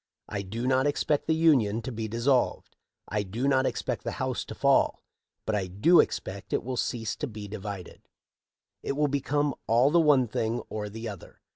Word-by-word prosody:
I 100 - -3
do 110 +5 -5
not 130 +2 +3
expect 145 0 0
the 160 - +3
Union 125 -10 +3
to 130 - -4
be 110 -1 -4
dissolved, 120 +4 0 0.3
I 105 +1 -1
do 110 +7 -2
not 135 -1 +3
expect - - -3
the - - -3
house - - -2
to - - -8
fall— - - +2 0.4
but 110 - -1
I 100 -3 0
do 105 - +4
expect 95 +1 -1
it - - +1
will 130 +2 -3
cease 115 -3 -2
to 150 - -3
be 105 -3 -8
divided 100 -3 -8 0.7
It - - -2
will 150 +1 +1
become 145 +1 0
all 120 +5 +4
the 170 +1 +5
one 140 -5 +4
thing 115 +1 -1
or 105 -1 -4
the 115 +2 -6
other. 100 -5 -9
115 Hz, 190 wpm, -28 LUFS, 105-140 Hz, 0.7 s, the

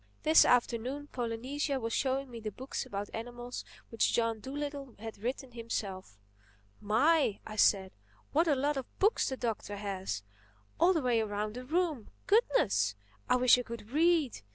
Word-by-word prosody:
This 315 +1 +7
afternoon 250 +4 +1
Polynesia 260 +4 -2
was 230 -1 -3
showing 270 0 0
me 235 - -7
the 215 -1 -4
books 260 +6 -5
about 200 +1 -5
animals 240 +2 -6 0.3
which 230 - +1
John 230 -1 +1
Dolittle 280 +1 -5
had 220 0 -8
written 250 +4 -4
himself. 200 - -5 0.6
"My!" 235 +3 +3
I 215 - -7
said, 195 -3 +3 0.4
"what 325 +4 +3
a 295 - +4
lot 285 +2 0
of 265 - -7
books 415 +4 +3
the 265 - -4
Doctor 220 -4 -3
has—all 105 - -2
the 320 -5 0
way 245 -2 +3
around 210 0 -2
the 250 +2 -7
room! 315 - -1 0.2
Goodness! 105 - +3 0.3
I - - +5
wish 250 0 +6
I - - 0
could 235 -2 -9
read! 315 - +2
240 Hz, 155 wpm, -31 LUFS, 210-280 Hz, 0.6 s, This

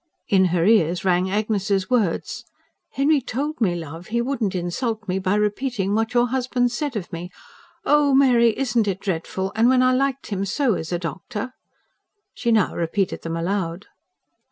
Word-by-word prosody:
In 190 -4 +4
her 175 -1 +1
ears 180 -3 +3
rang 180 0 +2
Agnes's 200 -2 0
words: 215 -9 0 0.5
"Henry 285 +1 +2
told 280 +4 -4
me, 180 -5 +2
love, 165 +1 -7
he 235 +2 -1
wouldn't 235 -6 -1
insult 215 +5 -3
me 185 +1 0
by 190 +1 0
repeating 210 -1 -1
what 225 +3 0
your 240 0 +3
husband 250 -1 0
said 275 +1 -3
of 190 -3 -5
me. 170 +1 -5 0.6
Oh, 290 -2 +4
Mary, 240 -5 +4
isn't 240 -5 +1
it 195 -1 -1
dreadful? 190 0 -3
And 225 +3 +4
when 255 0 +4
I 255 0 +4
liked 270 -2 -1
him 195 -1 -1
so 235 +5 +1
as 160 -2 -4
a 175 - +1
doctor!" 185 - -5 0.8
She 235 - -1
now 220 -4 +3
repeated 175 +3 -1
them 165 0 -4
aloud. 175 +1 -2
210 Hz, 170 wpm, -22 LUFS, 185-245 Hz, 0.8 s, In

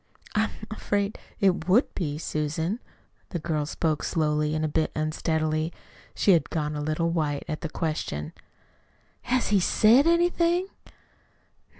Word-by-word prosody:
"I'm 215 +1 +2 0.2
afraid 205 -1 -1 0.2
it 185 -4 +2
would 225 +9 +4
be, 150 -5 -2
Susan." 160 +6 -2 0.5
The 175 - -3
girl 155 -3 -2
spoke 155 -1 -1
slowly, 150 -1 0
a 155 0 0
bit 155 +1 0
unsteadily. 155 +1 0 0.4
She 200 - +4
had 170 -3 +3
gone 150 -2 -2
a 150 - -3
little 155 +3 0
white 150 -4 -1
at 155 - -4
the 165 - -3
question. 155 - -3 0.9
"Has 250 +1 0
he 205 -1 +4
SAID 230 - +5
anything?" 345 +2 +2
160 Hz, 130 wpm, -26 LUFS, 155-205 Hz, 0.9 s, SAID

